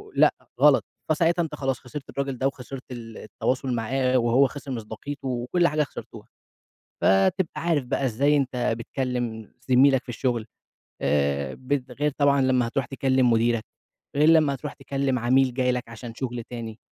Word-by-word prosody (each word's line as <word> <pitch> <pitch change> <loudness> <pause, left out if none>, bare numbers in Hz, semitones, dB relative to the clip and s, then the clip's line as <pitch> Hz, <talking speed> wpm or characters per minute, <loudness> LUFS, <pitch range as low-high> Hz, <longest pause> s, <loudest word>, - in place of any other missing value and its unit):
لأ - - +5 0.3
غلط، - - +6 0.3
فساعتها 170 +2 +2
أنت 150 -2 -5
خلاص 135 -2 -2
خسرت 135 +2 -9
الراجل 135 -2 -3
ده 135 - +1
وخسرت 135 0 -7
ال 115 -2 -8
التواصل 130 +3 -2
معاه 130 +3 +1
وهو 125 +3 +4
خسر 140 -1 -8
مصداقيته 130 +5 -6
وكل 130 +8 +1
حاجة 150 0 +1
خسرتوها. - - -10 0.7
فتبقى 95 - +3
عارف 160 -6 +1
بقى 135 - -1
إزاي 140 +5 +2
أنت 125 -3 0
بتكلم 120 -3 -3 0.2
زميلك 130 0 +5
في - - -14
الشغل، 120 -2 -1 0.6
آآ، 70 -1 0
ب 130 -1 -3
غير 145 +3 0
طبعًا 140 -1 +4
لمّا 130 -2 +2
هتروح 130 +1 -1
تكلم 130 -2 +2
مديرك، 115 0 +2 0.5
غير 150 +2 +5
لما 155 -4 +5
هتروح 145 +2 -6
تكلم 135 -2 -1
عميل 130 +1 +3
جاي 125 -1 +2
لك 125 -1 -3
عشان 115 0 -9
شغل 120 -1 -4
تاني. 115 -2 -6
130 Hz, 160 wpm, -25 LUFS, 120-140 Hz, 0.7 s, غلط